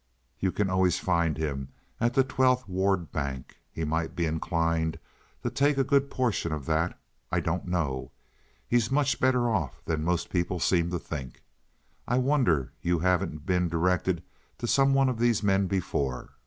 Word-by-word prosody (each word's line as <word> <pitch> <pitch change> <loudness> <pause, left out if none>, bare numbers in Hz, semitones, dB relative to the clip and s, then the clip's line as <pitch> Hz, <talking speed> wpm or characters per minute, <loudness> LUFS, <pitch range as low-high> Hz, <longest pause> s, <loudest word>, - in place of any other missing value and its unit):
You 95 - +1
can 105 +1 0
always 95 -2 +2
find 85 -4 +1
him 70 -4 -3 0.3
at 120 +1 +1
the 135 - +5
Twelfth 130 -2 +2
Ward 95 -2 0
Bank. 70 -4 -4
He 80 - -4
might 80 +1 -1
be 85 - 0
inclined 80 0 0 0.5
to - - -1
take 140 +1 +2
a 135 - +4
good 140 +1 +2
portion 120 - 0
of 75 -3 -4
that—I 80 +2 -2
don't 85 +2 -2
know. 75 -8 -1 0.6
He's 120 -2 +2
much 140 0 +1
better 125 -2 +3
off 95 - -2
than 80 -1 -1
most 85 +1 -1
people 90 0 0
seem 85 0 +2
to 90 - -1
think. 70 -6 -7 0.6
I 125 - +1
wonder 125 - +2
you 90 0 +1
haven't 85 -3 0
been 90 -2 +1
directed 85 +1 +1 0.3
to - - -4
some 135 +3 +3
one 135 -1 +4
of 125 -3 -1
these 120 -2 +2
men 95 -1 +3
before." 70 -9 -2
90 Hz, 170 wpm, -28 LUFS, 80-120 Hz, 0.6 s, the